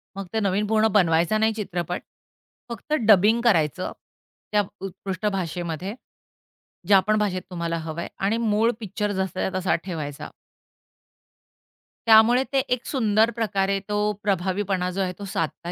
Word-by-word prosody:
मग 195 -1 -6
ते 220 - +1
नवीन 200 0 0
पूर्ण 220 +1 +3
बनवायचा 175 +1 +3
नाही 220 +1 +2
चित्रपट, 180 -5 -4 0.7
फक्त 235 +6 -5
डबिंग 215 +3 +5
करायचं 185 - +2 0.6
त्या 210 -1 +3 0.2
उत्कृष्ट 195 +1 -5
भाषेमध्ये. 175 +1 -4 0.9
ज्यापण 205 +2 +4
भाषेत 190 -3 -1
तुम्हाला 170 -2 -2
हवंय 160 +1 -5
आणि 200 +4 +1
मूळ 225 0 +2
पिक्चर 210 0 -3
जसाच्या 190 -1 -2
तसा 185 0 +1
ठेवायचा. 155 -6 -5 1.8
त्यामुळे 225 +3 +6
ते 270 - +4 0.2
एक 250 - -17
सुंदर 220 -4 +2
प्रकारे 200 -3 0
तो 210 - -1 0.3
प्रभावीपणा 190 -1 0
जो 195 +2 -2
आहे 185 -1 -1
तो 200 - -6
साधता 165 +2 -3
195 Hz, 130 wpm, -24 LUFS, 180-215 Hz, 1.8 s, त्यामुळे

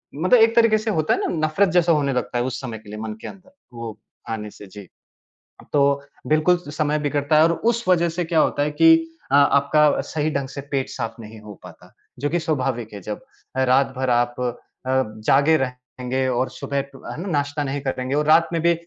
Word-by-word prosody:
मतलब 185 - +4
एक 225 +1 +4
तरीके 230 -2 +5
से 215 +1 -2
होता 155 -6 +1
है - - -1
ना, - - -1 0.2
नफ़रत 180 +6 +2
जैसा 175 -1 +4
होने 145 -4 +1
लगता 125 -1 -2
है 120 - +1
उस 130 -1 -3
समय 120 -4 -6
के 105 -1 -16
लिए 105 +1 -7
मन 110 0 -5
के - - -7
अंदर, 195 +5 -13 0.2
वो 115 -2 -7 0.3
आने 105 -2 -4
से। 100 - -13
जी, 100 0 -12 0.9
तो 140 -1 +3 0.3
बिल्कुल 155 +4 +3
समय 150 0 0
बिगड़ता 145 +1 +1
है 155 - +7
और 165 - +4
उस 235 +5 0
वज़ह 170 -2 +3
से 170 +1 -3
क्या 165 -1 +1
होता 145 - +2
है 150 - -1
कि 165 +2 +6 0.4
अ, - - +4
आपका 145 +1 +4
सही 155 0 -2
ढंग 140 -2 -2
से 140 - -7
पेट 135 -2 -1
साफ़ 115 -3 -4
नहीं 110 0 -11
हो 105 -1 -10
पाता, - - -14 0.3
जो 145 +3 -1
कि 175 - 0
स्वाभाविक 125 -8 -2
है, 100 - -7
जब 105 +3 -5 0.4
रात 130 +1 +2
भर 130 0 -1
आप 120 0 +1
अ, 125 -1 -1 0.3
जागे 130 +4 +2
रहेंगे 125 0 -3
और 130 +1 0
सुबह 140 -3 -3
टू 135 -1 -14
है - - -6
न, 195 - -5
नाश्ता 145 0 -1
नहीं 140 0 -3
करेंगे 130 0 -2
और 150 +1 +1
रात 160 +2 +5
में 165 - 0
भी 170 +1 +4
140 Hz, 220 wpm, -22 LUFS, 125-160 Hz, 0.9 s, है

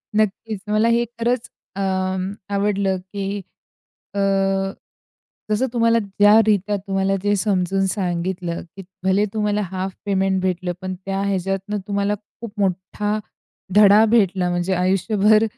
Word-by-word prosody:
नक्कीच. 215 0 0
मला 215 +2 +2
हे 235 +1 +3
खरंच 240 +1 0 0.3
अं, 190 -1 -1 0.2
आवडलं 200 -1 +1
की 195 +2 -6 0.9
अ, 200 - 0 1.3
जसं 215 +5 +1
तुम्हाला 230 -1 +3
ज्या 205 +1 +4
रीत्या 205 -1 +2
तुम्हाला 195 0 0
ते 205 0 +2
समजून 195 -1 +1
सांगितलं, 180 -2 -2
की 195 - -8 0.2
भले 190 +2 +3
तुम्हाला 210 -1 0
हाफ 190 +1 -3
पेमेंट 190 -1 +1
भेटलं. 180 -1 -1
पण 185 0 -3
त्या 195 0 -1
ह्याच्यातनं 195 +1 -1
तुम्हाला 200 0 0 0.3
खूप 230 -3 -6
मोठा 195 +2 -1 0.6
धडा 210 +1 +7
भेटला 190 -5 +3
म्हणजे 175 +2 0
आयुष्यभर 200 +4 +3
195 Hz, 125 wpm, -21 LUFS, 190-210 Hz, 1.3 s, धडा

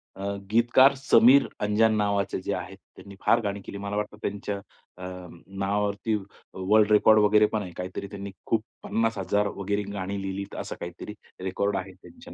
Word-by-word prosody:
अ, 95 - -8 0.3
गीतकार 120 +4 +5
समीर 130 0 +5
अंजान 110 +2 +3
नावाचे 100 -2 0
जे 100 - -2
आहेत, 95 +1 -7 0.2
त्यांनी 100 -1 -12
फार 115 - +5
गाणी 100 -1 -3
केली. - - -7
मला 100 +1 -4
वाटतं 105 0 -3
त्यांच्या 100 0 -3 0.4
अ, 90 0 -7 0.4
नावावरती 100 +2 -1 0.4
वर्ल्ड 105 +3 +3
रेकॉर्ड 110 +1 +6
वगैरे 105 +1 +5
पण 110 - 0
आहे. 90 -3 -7
काहीतरी 90 +2 -5
त्यांनी 100 -1 -7 0.2
खूप 115 - +2 0.2
50,000 105 -2 0
वगैरे 100 +1 -2
गाणी 100 0 -4
लिहिलीत, 95 0 -5
असं - - -5
काहीतरी 90 +4 -7 0.3
रेकॉर्ड 100 +2 -1
आहे 95 0 -6
त्यांच्या 245 - -14
100 Hz, 160 wpm, -26 LUFS, 95-110 Hz, 0.4 s, रेकॉर्ड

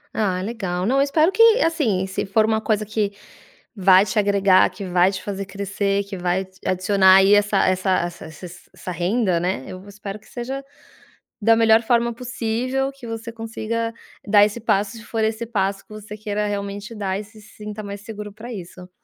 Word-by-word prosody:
Ah, 190 -4 0
legal, 190 -5 -3
não, 260 +5 +2
eu - - +4
espero 310 +5 +3
que, 455 - +1 0.2
assim, 250 - +1
se 190 - -3
for 215 +3 +2
uma 220 0 +1
coisa 215 -1 0
que 210 -1 -1 0.6
vai 190 0 +5
te 190 - -5
agregar, 200 -3 +4
que 185 +2 -8
vai 180 +1 +3
te 190 - -5
fazer 195 -1 -4
crescer, 200 +1 -2
que 200 0 -7
vai 180 +1 -1
t 190 0 -22
adicionar 190 0 +4
aí, 195 +1 +6
essa 205 0 +2
essa 185 +1 +1
essa 175 -2 -5
sa 160 +4 -10
sa 175 +1 -15
essa - - -8
renda, 180 +1 0
né? 175 -6 -2
Eu 185 - -8
v 195 - -15
espero 205 0 -8
que - - -22
seja 265 +3 -5 0.8
da 225 +2 +4
melhor 225 0 +5
forma 235 0 +2
possível 250 +2 -2
que 270 -3 -12
você 225 0 -6
consiga 230 0 -4 0.3
dar 205 0 +6
esse 210 +3 -3
passo, 205 -2 +1
se 220 - -12
for 225 -1 -1
esse 220 +1 -2
passo 195 -3 -1
que - - -45
você 215 0 -9
queira 210 0 -2
realmente 205 +2 -5
dar 195 -2 -2
e 210 - -6
se 220 +1 -17
sinta 210 0 -9
mais 200 0 -7
seguro 210 -1 -7
pra 225 +4 -9
isso. 180 -2 -9
205 Hz, 200 wpm, -22 LUFS, 190-225 Hz, 0.8 s, aí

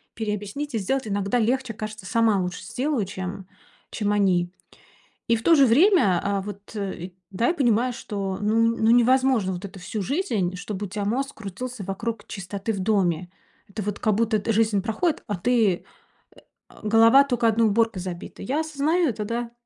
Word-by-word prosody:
переобъяснить 220 +6 -4
и - - +2
сделать. 260 +5 -1
Иногда 200 +3 0
легче, 250 +1 0
кажется, 215 -2 -7
сама 225 -1 +2
лучше 180 0 -4
сделаю, 260 -5 -1
чем 185 0 -6 0.4
чем 205 -2 -1
они. 185 -4 +2 0.8
И 230 - +4
в 225 - -4
то 335 - +6
же 275 -2 +6
время, 260 - +4
э, 200 -1 0
вот, 200 +2 -9 0.6
да, 230 +6 0
я - - +2
понимаю, 245 -3 +2
что 200 -6 -4
ну 210 +2 +1
ну, 230 -1 +3
невозможно 245 -4 +3
вот 180 +3 -6
это 195 0 -10
всю 210 +4 -4
жизнь, 220 - -1
чтобы 200 +1 -5
у 195 - -8
тебя 205 0 -3
мозг 270 +6 -1
крутился 220 +2 -6
вокруг 225 +5 -4
чистоты 195 +2 -4
в 200 - -4
доме. 185 -4 0 0.4
Это 210 +2 -6
вот, 205 0 -3
как 215 - +2
будто, 225 -1 +2
эт 200 - -7
жизнь 215 -2 +2
проходит, 270 +9 -1
а 205 - -1
ты, 220 +1 +2
э, - - -17 0.9
а, - - -17
голова 225 +5 +7
тока 245 -4 +1
одной 225 0 +3
уборкой 225 -2 +1
забита. 175 -1 -7
Я 290 +5 -1
осознаю 315 +3 +1
это, 215 -2 -3
да. 235 +2 -3
220 Hz, 180 wpm, -24 LUFS, 195-245 Hz, 0.9 s, голова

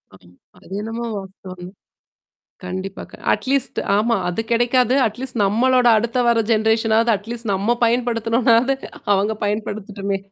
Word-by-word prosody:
ம். 90 -1 -21 0.2
அது - - -19
என்னமோ 225 +2 -5
வாஸ்தவம்தான். 185 -1 -10 0.9
கண்டிப்பா 190 +2 -5 0.3
அட்லீஸ்ட் 270 0 -1 0.2
ஆமா. 230 +3 +2
அது 180 +5 -2
கிடைக்காது. 245 +1 +2
அட்லீஸ்ட் 245 +3 -5
நம்மளோட 245 +4 +3
அடுத்த 235 +3 -1
வர 235 -1 +3 0.8
அட்லீஸ்ட் 225 +1 -4
நம்ம 205 +5 +1
பயன்படுத்தணும்னாவது 235 +1 +2 0.4
அவங்க 200 +3 +1
பயன்படுத்துட்டுமே. 205 -1 -3
225 Hz, 105 wpm, -20 LUFS, 195-240 Hz, 0.9 s, நம்மளோட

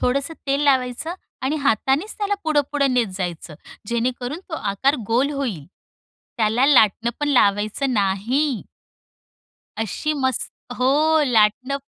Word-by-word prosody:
थोडंसं 275 +5 0
तेल 275 +1 +1
लावायचं 265 +4 +1 0.3
आणि 285 +4 0
हातांनीच 275 - +1
त्याला 410 -1 0
पुढं-पुढं 290 -3 +1
नेत 240 -3 +2
जायचं. 175 -4 -5 0.3
जेणेकरून 245 +5 -2
तो 320 - -4
आकार 230 +4 0
गोल 255 +5 +1
होईल. 235 - -4 0.7
त्याला 230 +3 +2
लाटणं 235 -4 +4
पण 295 - 0
लावायचं 215 +2 +2
नाही. 225 +7 0 1.2
अशी 225 - -2
मस् 260 -3 -1 0.3
हो. 255 +1 +2 0.4
लाटणं 245 +3 +2
255 Hz, 115 wpm, -22 LUFS, 220-280 Hz, 1.2 s, लाटणं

